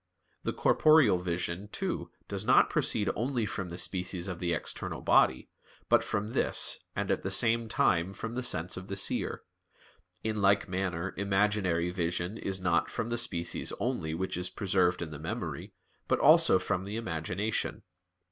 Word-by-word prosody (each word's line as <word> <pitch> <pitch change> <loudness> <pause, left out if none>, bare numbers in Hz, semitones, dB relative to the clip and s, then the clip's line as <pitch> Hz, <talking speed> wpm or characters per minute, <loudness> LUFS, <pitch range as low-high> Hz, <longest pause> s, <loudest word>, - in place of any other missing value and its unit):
The - - -2
corporeal 155 - +4
vision, 90 +2 -3
too, - - -4 0.2
does - - -3
not - - +4
proceed 105 -2 +1
only 120 0 -1
from 95 -3 -4
the 85 - -7
species 90 -1 -2
of 90 -3 -5
the 85 -1 -1
external 85 - -4
body, 65 - +3 0.4
but - - +5
from 105 +1 -2
this, - - +3 0.2
and - - -1
at - - 0
the 95 - -3
same 115 +3 +2
time 95 -9 +2
from 115 +3 -6
the 125 - -2
sense 90 -7 0
of 95 +1 -8
the 100 - -4
seer; 95 - -1 0.8
in 110 -1 -2
like 100 0 +3
manner 90 -1 -3
imaginary 95 -4 +1
vision 90 +3 -2
is 95 -1 -3
not 90 -2 +1
from 115 -1 -3
the 120 - -1
species 85 -8 -1
only 95 -11 -2
which 95 +1 -3
is 90 0 -1
preserved 95 -3 +1
in 80 - -7
the 75 - -8
memory, 80 - -5 0.4
but - - +2
also 95 - +6
from 90 0 -2
the 100 +2 -6
imagination. 95 +1 -3
95 Hz, 165 wpm, -30 LUFS, 90-105 Hz, 0.8 s, also